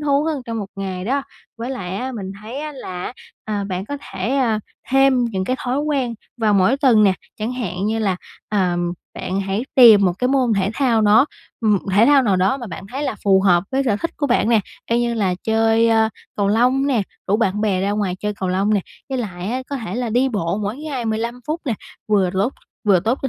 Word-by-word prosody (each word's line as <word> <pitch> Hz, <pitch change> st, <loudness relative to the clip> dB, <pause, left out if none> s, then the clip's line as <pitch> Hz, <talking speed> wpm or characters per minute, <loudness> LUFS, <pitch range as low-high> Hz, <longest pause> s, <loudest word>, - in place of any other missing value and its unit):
thú 285 Hz, -1 st, +2 dB
hơn 305 Hz, -4 st, -2 dB
trong 230 Hz, -1 st, -3 dB
một 205 Hz, -, -4 dB
ngày 190 Hz, -2 st, -4 dB
đó. 275 Hz, +6 st, 0 dB, 0.4 s
Với 240 Hz, +3 st, -4 dB
lại 190 Hz, -7 st, -4 dB
á, 260 Hz, +4 st, -3 dB
mình 195 Hz, -4 st, -5 dB
thấy 235 Hz, +6 st, -6 dB
á 305 Hz, -1 st, -5 dB
là, 185 Hz, -6 st, -6 dB, 0.3 s
ờ, 205 Hz, -2 st, -2 dB
bạn 190 Hz, -1 st, -3 dB
có 285 Hz, +5 st, -5 dB
thể, 220 Hz, +8 st, -1 dB
ờ, 230 Hz, -5 st, +2 dB, 0.3 s
thêm 270 Hz, -2 st, +4 dB
những 190 Hz, -5 st, -2 dB
cái 255 Hz, -, -1 dB
thói 250 Hz, +2 st, -1 dB
quen 275 Hz, -5 st, -1 dB, 0.2 s
vào 220 Hz, -3 st, +2 dB
mỗi 195 Hz, +7 st, +4 dB
tuần 255 Hz, -7 st, +4 dB
nè, 195 Hz, -, +5 dB, 0.3 s
chẳng 220 Hz, +3 st, -2 dB
hạn 200 Hz, -6 st, -3 dB
như 220 Hz, +1 st, 0 dB
là, 195 Hz, -4 st, 0 dB, 0.3 s
ờ, 185 Hz, -4 st, +1 dB, 0.4 s
bạn 190 Hz, +2 st, -2 dB
hãy 195 Hz, +4 st, -2 dB
tìm 225 Hz, -6 st, +8 dB
một 180 Hz, -, +3 dB
cái 250 Hz, -, +1 dB
môn 260 Hz, -3 st, +2 dB
thể 195 Hz, +1 st, +1 dB
thao 245 Hz, -5 st, +2 dB
đó 215 Hz, +5 st, +5 dB, 0.3 s
m 215 Hz, -2 st, +3 dB, 0.2 s
thể 210 Hz, +5 st, +5 dB
thao 285 Hz, -2 st, +6 dB
nào 200 Hz, -5 st, +2 dB
đó 190 Hz, +8 st, +2 dB
mà 245 Hz, -3 st, -7 dB
bạn 190 Hz, 0 st, -7 dB
thấy 275 Hz, +3 st, -3 dB
là 285 Hz, -, -1 dB
phù 195 Hz, -1 st, +5 dB
hợp 180 Hz, -2 st, +4 dB
với 270 Hz, +1 st, +2 dB
sở 210 Hz, -5 st, +2 dB
thích 335 Hz, -, -3 dB
của 290 Hz, -, 0 dB
bạn 245 Hz, -3 st, +2 dB
nè. 225 Hz, -3 st, +4 dB, 0.3 s
Y 235 Hz, +1 st, +3 dB
như 240 Hz, -1 st, 0 dB
là 195 Hz, -5 st, +1 dB
chơi 225 Hz, +1 st, +3 dB, 0.5 s
cầu 200 Hz, -1 st, +1 dB
lông 250 Hz, +6 st, +3 dB
nè, 245 Hz, -7 st, +2 dB, 0.2 s
rủ 200 Hz, +3 st, +2 dB
bạn 210 Hz, -2 st, 0 dB
bè 200 Hz, -4 st, +1 dB
ra 195 Hz, +1 st, 0 dB
ngoài 205 Hz, -3 st, -1 dB
chơi 210 Hz, 0 st, -2 dB
cầu 185 Hz, -, -1 dB
lông 195 Hz, +3 st, +1 dB
nè, 200 Hz, -, +2 dB, 0.3 s
với 265 Hz, -, -2 dB
lại 190 Hz, -4 st, -4 dB
á 255 Hz, +2 st, -2 dB
có 280 Hz, -, -1 dB
thể 230 Hz, -4 st, -5 dB
là 240 Hz, -2 st, -2 dB
đi 250 Hz, +4 st, +2 dB
bộ 200 Hz, -4 st, -1 dB
mỗi 205 Hz, +4 st, -2 dB
ngày 285 Hz, -5 st, -4 dB
15 230 Hz, +2 st, -2 dB
phút 315 Hz, +2 st, -2 dB
nè, 245 Hz, -6 st, 0 dB, 0.3 s
vừa 195 Hz, -4 st, +3 dB
lốt 200 Hz, +7 st, 0 dB, 0.3 s
vừa 195 Hz, -4 st, +4 dB
tốt 230 Hz, +8 st, 0 dB
cho 270 Hz, -, 0 dB
220 Hz, 235 wpm, -20 LUFS, 195-255 Hz, 0.5 s, tìm